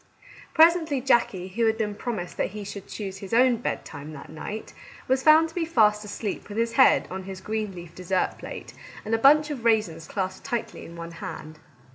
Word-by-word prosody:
Presently, 320 Hz, -3 st, +5 dB
Jackie, 235 Hz, -8 st, +1 dB
who 225 Hz, +4 st, +1 dB
had 220 Hz, 0 st, +1 dB
been 210 Hz, -2 st, -1 dB
promised 205 Hz, -5 st, -5 dB
that -, -, 0 dB
he 210 Hz, -, -5 dB
should 200 Hz, 0 st, -8 dB
choose 195 Hz, -3 st, -6 dB
his 195 Hz, +3 st, -3 dB
own 250 Hz, 0 st, +5 dB
bedtime 155 Hz, -9 st, -5 dB
that 140 Hz, 0 st, -10 dB
night, 210 Hz, +7 st, -7 dB, 0.3 s
was 260 Hz, +1 st, +2 dB
found 315 Hz, +3 st, +6 dB
to -, -, -15 dB
be 345 Hz, -, -1 dB
fast 215 Hz, -9 st, +3 dB
asleep 210 Hz, 0 st, -5 dB
with 205 Hz, -, -6 dB
his 230 Hz, 0 st, +1 dB
head 260 Hz, +2 st, +5 dB
on 190 Hz, 0 st, -5 dB
his 190 Hz, -1 st, -7 dB
green 215 Hz, -1 st, -3 dB
leaf 170 Hz, -1 st, -10 dB
dessert 185 Hz, 0 st, -1 dB
plate, -, -, -8 dB, 0.3 s
and 215 Hz, -, -2 dB
a 225 Hz, -, +3 dB
bunch 300 Hz, +4 st, +5 dB
of 260 Hz, -5 st, -5 dB
raisins 195 Hz, -9 st, +1 dB
clasped 190 Hz, -2 st, -3 dB
tightly 235 Hz, -4 st, -4 dB
in 170 Hz, -, -11 dB
one 170 Hz, 0 st, -7 dB
hand. 155 Hz, -2 st, -8 dB
215 Hz, 200 wpm, -26 LUFS, 185-245 Hz, 0.3 s, found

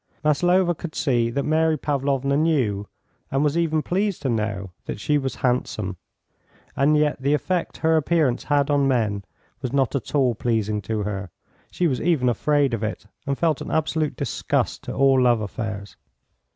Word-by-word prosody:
Maslova 175 Hz, +4 st, +3 dB
could 160 Hz, 0 st, -8 dB
see 120 Hz, -5 st, +1 dB
that 140 Hz, +4 st, -1 dB
Mary 160 Hz, 0 st, +2 dB
Pavlovna 140 Hz, -1 st, 0 dB
knew, 130 Hz, -11 st, +1 dB, 0.4 s
and 135 Hz, +2 st, +1 dB
was 150 Hz, 0 st, +1 dB
even 160 Hz, -2 st, +1 dB
pleased 195 Hz, -2 st, -1 dB
to 135 Hz, -, 0 dB
know, 100 Hz, -4 st, -2 dB, 0.2 s
that -, -, -4 dB
she 150 Hz, +7 st, +1 dB
was 135 Hz, -1 st, -3 dB
handsome, 110 Hz, -6 st, -1 dB, 0.8 s
and 150 Hz, +2 st, +3 dB
yet 150 Hz, -2 st, +1 dB
the 140 Hz, +2 st, +3 dB
effect 180 Hz, +3 st, -2 dB
her 160 Hz, 0 st, +3 dB
appearance 155 Hz, -5 st, +1 dB
had 145 Hz, -1 st, +2 dB
on 140 Hz, -1 st, +3 dB
men 110 Hz, -6 st, 0 dB, 0.4 s
was 130 Hz, -3 st, -3 dB
not 135 Hz, -2 st, +1 dB
at 140 Hz, +2 st, -3 dB
all 130 Hz, -4 st, +3 dB
pleasing 110 Hz, -2 st, -1 dB
to 105 Hz, +2 st, -2 dB
her; 100 Hz, -2 st, -4 dB, 0.4 s
she 180 Hz, -, -1 dB
was 135 Hz, -7 st, +1 dB
even 150 Hz, -7 st, +2 dB
afraid 145 Hz, +2 st, +1 dB
of 115 Hz, -, -1 dB
it, 110 Hz, -1 st, -4 dB, 0.2 s
and 140 Hz, -1 st, 0 dB
felt 160 Hz, -4 st, +1 dB
an -, -, -5 dB
absolute 155 Hz, -1 st, 0 dB
disgust 140 Hz, -7 st, -1 dB
to -, -, -4 dB
all 135 Hz, -1 st, +4 dB
love 120 Hz, -2 st, +4 dB
affairs. 105 Hz, -1 st, -5 dB
140 Hz, 175 wpm, -23 LUFS, 115-155 Hz, 0.8 s, all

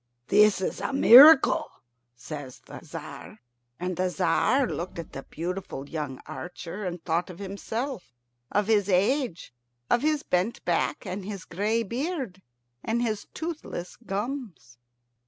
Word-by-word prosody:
"This 210 Hz, -1 st, +5 dB
is -, -, -3 dB
a -, -, -2 dB
miracle," 275 Hz, +3 st, +8 dB, 0.5 s
says 135 Hz, +1 st, -8 dB
the -, -, -10 dB
Tzar. -, -, -9 dB, 0.4 s
And 180 Hz, +1 st, -2 dB
the 185 Hz, 0 st, +1 dB
Tzar 250 Hz, +11 st, +2 dB
looked 180 Hz, -6 st, -5 dB
at 170 Hz, -, -7 dB
the 135 Hz, -, -6 dB
beautiful 170 Hz, -3 st, -5 dB
young 145 Hz, -4 st, -5 dB
archer, 180 Hz, +2 st, -7 dB
and 175 Hz, -2 st, -5 dB
thought 170 Hz, +2 st, 0 dB
of 180 Hz, -, -9 dB
himself 200 Hz, -, -5 dB, 0.4 s
of 205 Hz, 0 st, +2 dB
his 205 Hz, -2 st, +2 dB
age, 200 Hz, -, +1 dB, 0.4 s
of 240 Hz, -, +4 dB
his 305 Hz, -1 st, +1 dB
bent 185 Hz, +6 st, -1 dB
back, 175 Hz, -1 st, 0 dB
and 190 Hz, +2 st, -4 dB
his 200 Hz, -2 st, -7 dB
gray 215 Hz, +6 st, 0 dB
beard, 250 Hz, -, -4 dB, 0.4 s
and 235 Hz, +2 st, 0 dB
his 215 Hz, -3 st, -2 dB
toothless 315 Hz, -, -5 dB
gums. 210 Hz, -, -5 dB
195 Hz, 135 wpm, -27 LUFS, 175-235 Hz, 0.5 s, miracle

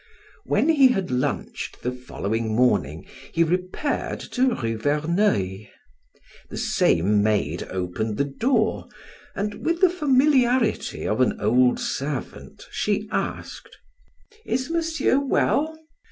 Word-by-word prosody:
When 305 Hz, -, +1 dB
he 285 Hz, -5 st, +6 dB
had 195 Hz, -, -1 dB
lunched 125 Hz, 0 st, -3 dB
the 125 Hz, -, -1 dB
following 115 Hz, -3 st, -3 dB
morning 105 Hz, -9 st, +1 dB, 0.3 s
he 170 Hz, -, +3 dB
repaired 180 Hz, -, -2 dB
to 255 Hz, -1 st, +2 dB
Rue 115 Hz, -3 st, -2 dB
Verneuil. 145 Hz, -, 0 dB, 0.8 s
The -, -, -7 dB
same 100 Hz, +5 st, +2 dB
maid 105 Hz, 0 st, 0 dB
opened 95 Hz, +4 st, -3 dB
the 140 Hz, -, +1 dB
door, 220 Hz, -, 0 dB, 0.5 s
and 205 Hz, +1 st, -4 dB
with 335 Hz, +1 st, 0 dB
the 370 Hz, -2 st, +5 dB
familiarity 260 Hz, -7 st, +2 dB
of 110 Hz, +4 st, 0 dB
an 130 Hz, -, +1 dB
old 125 Hz, +4 st, +3 dB
servant 145 Hz, -, -5 dB
she -, -, -1 dB
asked: -, -, -4 dB, 0.7 s
"Is 260 Hz, +4 st, -2 dB
Monsieur 325 Hz, -5 st, +1 dB
well?" 305 Hz, +3 st, 0 dB
165 Hz, 115 wpm, -24 LUFS, -, 0.8 s, he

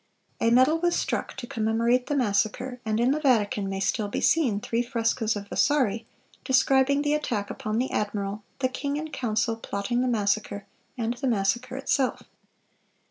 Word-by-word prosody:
A 230 Hz, -, +3 dB
medal 260 Hz, +7 st, +4 dB
was 345 Hz, 0 st, +1 dB
struck -, -, -2 dB
to 260 Hz, -, -5 dB
commemorate 230 Hz, +2 st, +1 dB
the 290 Hz, -, -1 dB
massacre, 245 Hz, +2 st, 0 dB
and 220 Hz, -1 st, -1 dB
in 245 Hz, +2 st, +3 dB
the 300 Hz, -, +1 dB
Vatican 210 Hz, -8 st, +1 dB
may 195 Hz, 0 st, -3 dB
still 205 Hz, +2 st, 0 dB
be 205 Hz, -, -3 dB
seen 255 Hz, -11 st, +2 dB
three 230 Hz, +3 st, -1 dB
frescoes 230 Hz, -2 st, 0 dB
of 200 Hz, -1 st, -6 dB
Vasari, 240 Hz, -6 st, +1 dB, 0.4 s
describing 270 Hz, +2 st, +3 dB
the 295 Hz, 0 st, +1 dB
attack 230 Hz, -9 st, -2 dB
upon 215 Hz, +1 st, -3 dB
the 255 Hz, +2 st, -1 dB
admiral, 205 Hz, 0 st, -2 dB, 0.2 s
the 260 Hz, -, +3 dB
king 280 Hz, +2 st, -3 dB
in 310 Hz, +1 st, -5 dB
council 230 Hz, -4 st, -1 dB
plotting 225 Hz, +2 st, -2 dB
the 255 Hz, -, +1 dB
massacre, 205 Hz, -3 st, -1 dB, 0.3 s
and 230 Hz, 0 st, -1 dB
the 270 Hz, -, -1 dB
massacre 230 Hz, +3 st, 0 dB
itself. 270 Hz, -1 st, 0 dB
235 Hz, 170 wpm, -26 LUFS, 210-265 Hz, 0.4 s, medal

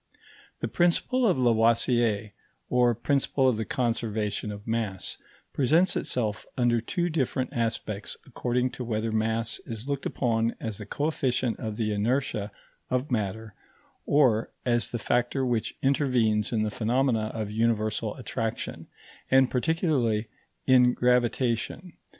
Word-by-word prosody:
The -, -, 0 dB
principle 175 Hz, -, +2 dB
of 185 Hz, -, +3 dB
Lavoisier, 115 Hz, -2 st, +2 dB, 0.4 s
or 125 Hz, -1 st, +4 dB
principle 135 Hz, +1 st, +1 dB
of 125 Hz, -4 st, +2 dB
the 110 Hz, -, -2 dB
conservation 110 Hz, -3 st, -1 dB
of 105 Hz, +1 st, -9 dB
mass, 110 Hz, -5 st, -3 dB, 0.3 s
presents 160 Hz, +7 st, +3 dB
itself 110 Hz, -3 st, -1 dB
under 120 Hz, -2 st, +2 dB
two 175 Hz, -, -1 dB
different 135 Hz, -5 st, -1 dB
aspects 110 Hz, -3 st, -2 dB
according 125 Hz, -1 st, -1 dB
to 125 Hz, -, -6 dB
whether 110 Hz, -1 st, -2 dB
mass 110 Hz, +1 st, -1 dB
is 115 Hz, +2 st, -7 dB
looked 140 Hz, -1 st, -2 dB
upon 115 Hz, -2 st, 0 dB
as 110 Hz, -2 st, -5 dB
the 105 Hz, -, -8 dB
coefficient 130 Hz, -4 st, -1 dB
of 110 Hz, -1 st, -4 dB
the 110 Hz, -2 st, 0 dB
inertia 110 Hz, -1 st, -1 dB, 0.4 s
of 130 Hz, +2 st, -1 dB
matter 110 Hz, -1 st, -2 dB, 0.5 s
or 125 Hz, -7 st, +3 dB, 0.2 s
as 120 Hz, -2 st, +1 dB
the 120 Hz, -, -3 dB
factor 120 Hz, +4 st, 0 dB
which 120 Hz, -3 st, -1 dB
intervenes 125 Hz, -6 st, +2 dB
in 110 Hz, -3 st, +1 dB
the 105 Hz, -, -1 dB
phenomena 115 Hz, 0 st, +1 dB
of 110 Hz, -2 st, -3 dB
universal 110 Hz, -1 st, 0 dB
attraction, 115 Hz, -3 st, -4 dB, 0.4 s
and 130 Hz, -1 st, +5 dB
particularly 125 Hz, -, +1 dB, 0.4 s
in 125 Hz, -1 st, +5 dB
gravitation. 125 Hz, +6 st, +1 dB
120 Hz, 130 wpm, -27 LUFS, 110-130 Hz, 0.5 s, and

